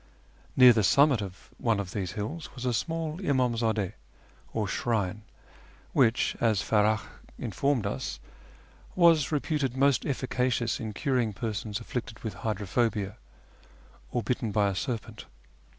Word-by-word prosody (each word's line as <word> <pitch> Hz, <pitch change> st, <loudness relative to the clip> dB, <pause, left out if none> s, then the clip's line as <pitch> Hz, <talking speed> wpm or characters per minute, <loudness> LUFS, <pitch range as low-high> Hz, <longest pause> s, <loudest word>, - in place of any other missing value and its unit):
Near 125 Hz, -2 st, +9 dB
the 110 Hz, -, +2 dB
summit 140 Hz, -, +5 dB
of 95 Hz, -2 st, -9 dB
one 115 Hz, -3 st, +1 dB
of 95 Hz, -2 st, -4 dB
these 95 Hz, -3 st, -3 dB
hills 130 Hz, +10 st, -5 dB
was 125 Hz, -1 st, -6 dB
a 125 Hz, -, +1 dB
small 160 Hz, -, -2 dB
imdmzddS, 115 Hz, -, +1 dB, 0.6 s
or 110 Hz, -2 st, -1 dB
shrine, 105 Hz, -2 st, -1 dB, 0.7 s
which, 120 Hz, -1 st, +3 dB
as 110 Hz, -4 st, +3 dB
Farach 105 Hz, +1 st, +2 dB, 0.3 s
informed 120 Hz, +2 st, 0 dB
us, 100 Hz, -, -3 dB, 0.8 s
was 165 Hz, -5 st, +5 dB
reputed 145 Hz, -3 st, -1 dB
most 140 Hz, -2 st, +4 dB
effica 130 Hz, -2 st, 0 dB
cious 120 Hz, 0 st, 0 dB
in 110 Hz, -3 st, -4 dB
curing 120 Hz, -1 st, 0 dB
persons 105 Hz, -1 st, -3 dB
afflicted 115 Hz, -1 st, -6 dB
with 110 Hz, -3 st, -3 dB
hydrophobia, 105 Hz, 0 st, -1 dB, 0.9 s
or 120 Hz, -, -1 dB
bitten 125 Hz, -4 st, -1 dB
by 100 Hz, -1 st, +2 dB
a 95 Hz, -, -3 dB
serpent. 120 Hz, -1 st, -4 dB
115 Hz, 135 wpm, -28 LUFS, 105-130 Hz, 0.9 s, Near